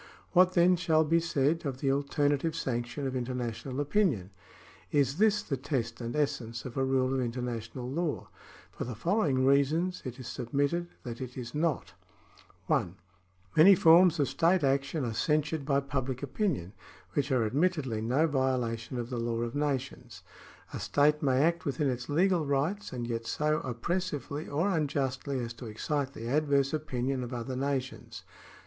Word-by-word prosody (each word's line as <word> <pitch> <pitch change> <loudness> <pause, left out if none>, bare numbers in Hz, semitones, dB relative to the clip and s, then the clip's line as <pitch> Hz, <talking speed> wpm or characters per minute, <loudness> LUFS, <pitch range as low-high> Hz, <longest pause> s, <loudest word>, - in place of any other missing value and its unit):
What 185 0 +5
then 180 0 +5
shall 160 -2 +3
be 165 +2 +3
said 165 -1 0
of 135 -4 -3
the 135 -1 +1
alternative 145 +2 0
sanction 125 -1 -3
of 130 -1 -2
international 125 +1 -3
opinion? 145 - +1 0.6
Is 140 -1 +2
this 210 -1 +3
the 135 - -2
test 125 -4 -3
and 120 0 -4
essence 115 -6 -2
of 125 - -7
a 135 - +1
rule 130 0 +1
of 135 - 0
international 120 0 -4
law? 155 +3 -2 0.4
For - - -5
the 120 -1 -5
following 145 - +1
reasons 150 +7 +2
it 125 -2 -6
is 125 - -7
submitted 140 +8 -1 0.2
that 120 0 -6
it 125 0 -7
is 120 -2 -6
not: 150 -10 -1 0.4
— - - -27
(1) 90 +1 0 0.6
Many 190 +6 +8
forms 170 0 +6
of 140 - +3
state 170 +1 +2
action 140 +1 +1
are 115 - -2
censured 150 +3 0
by 140 -1 +3
pubHc 130 -2 -3
opinion, 135 - -2 0.4
which 140 0 0
are 125 -4 +2
admittedly 135 -2 0
no 130 +8 +2
violation 130 -5 -1
of 120 +1 -4
the 120 - -2
law 115 0 -1
of 120 0 -3
nations. 140 -2 -3 0.5
A - - -4
state 150 +1 +2
may 135 -1 +3
act 170 +1 +1
within 145 -2 0
its 125 +1 -5
legal 175 +3 +3
rights, 150 +9 -1
and 120 -2 -4
yet 115 -1 -3
so 150 0 +1
oppressively 145 +3 -3
or 160 +7 0
unjustly 140 -6 -1
as 115 -1 -5
to 115 +1 -9
excite 140 +5 -2
the 115 -2 -7
adverse 140 0 +2
opinion 135 -4 -2
of 125 +1 -5
other 120 +2 -4
nations. 135 0 -3
140 Hz, 165 wpm, -30 LUFS, 125-155 Hz, 0.6 s, Many